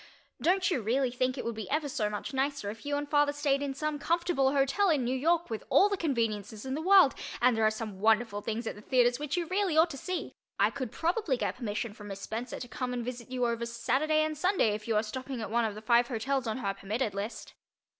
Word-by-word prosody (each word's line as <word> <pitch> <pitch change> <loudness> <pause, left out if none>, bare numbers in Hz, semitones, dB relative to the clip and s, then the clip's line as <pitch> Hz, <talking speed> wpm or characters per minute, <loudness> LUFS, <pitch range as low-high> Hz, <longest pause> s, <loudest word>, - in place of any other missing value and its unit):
Don't 370 +1 +2
you 270 - 0
really 250 +4 +1
think 255 +2 -1
it - - -4
would 235 - -1
be 220 -1 -6
ever 300 +1 0
so 215 -6 -1
much 210 +6 -5
nicer 270 -5 -1
if 225 +6 -11
you 290 - 0
and 290 0 -3
father 290 0 +3
stayed 285 -1 0
in 280 -1 -3
some 305 +1 -2
comfortable 330 -4 +1
hotel 280 +8 +2
in 295 -6 +2
New 245 +2 0
York 330 +3 +1
with 220 - -3
all 405 - +5
the 405 - 0
conveniences 225 - -2
in 265 - -3
the 300 - -2
world 375 -4 +6 0.3
and 250 -1 +4
there 225 - +1
are 215 - +6
some 215 -3 -6
wonderful 220 0 +2
things 225 +3 -3
at - - -2
the 210 - -12
theaters 245 +1 +2
which 295 +3 -2
you 345 - 0
really 370 -2 0
ought 325 +1 +5
to 275 - -6
see. 365 +6 -4 0.3
I - - +4
could 260 -5 -5
probably 330 - 0
get - - -2
permission 215 -2 -3
from 210 -1 -11
Miss 195 -1 -7
Spencer 230 +4 -5
to 245 - -6
come 250 -1 -4
and 240 -1 -3
visit 245 -1 -6
you 250 -1 0
over 235 0 -1
Saturday 260 +7 +1
and 310 0 -2
Sunday 360 - +2
if 210 +1 -6
you 225 - +1
are 210 - +3
stopping 255 +3 -5
at 220 - -5
one 235 0 +2
of 215 -2 -3
the 215 - -9
five 235 +1 +4
hotels 255 +2 -1
on 220 - -1
her 200 -6 -2
"permitted" 210 +3 -2
list. 200 +4 -5
255 Hz, 255 wpm, -30 LUFS, 225-290 Hz, 0.3 s, world